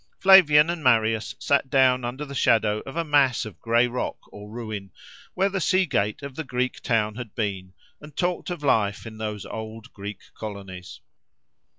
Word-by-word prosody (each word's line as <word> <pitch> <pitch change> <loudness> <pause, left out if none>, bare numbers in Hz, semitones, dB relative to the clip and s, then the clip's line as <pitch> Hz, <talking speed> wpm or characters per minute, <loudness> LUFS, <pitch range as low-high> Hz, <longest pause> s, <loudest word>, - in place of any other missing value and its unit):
Flavian 170 -5 +7
and 170 -3 -5
Marius 115 -3 +2
sat 140 -1 +1
down 130 -2 +3
under 125 +5 -4
the 140 - -9
shadow 110 -5 +2
of 135 - -8
a 170 - +1
mass 140 -6 +3
of 110 - -10
gray 115 +1 +3
rock 125 +1 -3 0.2
or 105 0 -10
ruin, 110 -3 -6 0.5
where 190 +2 +2
the 195 -1 -2
sea 185 +3 +3
gate 105 - -1
of 140 -1 -6
the 160 - -5
Greek 130 -2 -2
town 110 -3 0
had 115 -2 -8
been, 95 -4 -3 0.3
and 150 -1 -13
talked 180 0 -1
of 175 -4 -5
life 105 -7 +1
in 110 -1 -9
those 105 -2 -4
old 110 +1 -8
Greek 100 0 -7
colonies. 95 -4 -8
120 Hz, 180 wpm, -24 LUFS, 105-145 Hz, 0.5 s, Flavian